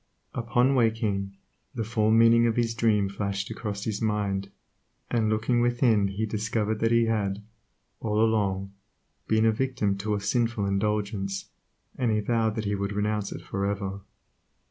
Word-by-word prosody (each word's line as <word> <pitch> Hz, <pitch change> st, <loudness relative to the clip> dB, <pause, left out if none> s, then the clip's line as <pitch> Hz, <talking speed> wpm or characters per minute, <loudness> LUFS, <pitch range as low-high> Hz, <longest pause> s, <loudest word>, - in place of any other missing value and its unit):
Upon 125 Hz, +2 st, +2 dB
waking, 110 Hz, -5 st, 0 dB, 0.4 s
the 115 Hz, -, -1 dB
fall 110 Hz, -1 st, +1 dB
meaning 115 Hz, +1 st, +6 dB
of 115 Hz, -, 0 dB
his 115 Hz, -1 st, +1 dB
dream 110 Hz, -4 st, +2 dB
flashed 100 Hz, +1 st, -3 dB
across 105 Hz, -2 st, -4 dB
his 105 Hz, -2 st, -3 dB
mind, 100 Hz, -3 st, -1 dB, 0.6 s
and 115 Hz, -3 st, +2 dB
looking 115 Hz, +3 st, +1 dB
within 120 Hz, -4 st, +3 dB
he 100 Hz, +3 st, -2 dB
discovered 110 Hz, 0 st, -1 dB
that 115 Hz, -, +2 dB
he 115 Hz, 0 st, +4 dB
had, 105 Hz, -2 st, -1 dB, 0.6 s
all 105 Hz, -1 st, -1 dB
along, 100 Hz, -3 st, +1 dB, 0.5 s
been 110 Hz, 0 st, +3 dB
a 110 Hz, -, +5 dB
victim 115 Hz, -4 st, 0 dB
to 105 Hz, +1 st, -1 dB
a -, -, -1 dB
sinful 115 Hz, +1 st, 0 dB
indulgence, 100 Hz, 0 st, -1 dB, 0.5 s
and 125 Hz, -3 st, +1 dB
he 105 Hz, -, +2 dB
vowed 110 Hz, 0 st, 0 dB
that 110 Hz, -, -3 dB
he 100 Hz, -, 0 dB
would 100 Hz, 0 st, -2 dB
renounce 105 Hz, 0 st, -1 dB
it -, -, -7 dB
for 100 Hz, -, -3 dB
ever. 100 Hz, -1 st, -3 dB
110 Hz, 160 wpm, -27 LUFS, 100-115 Hz, 0.6 s, meaning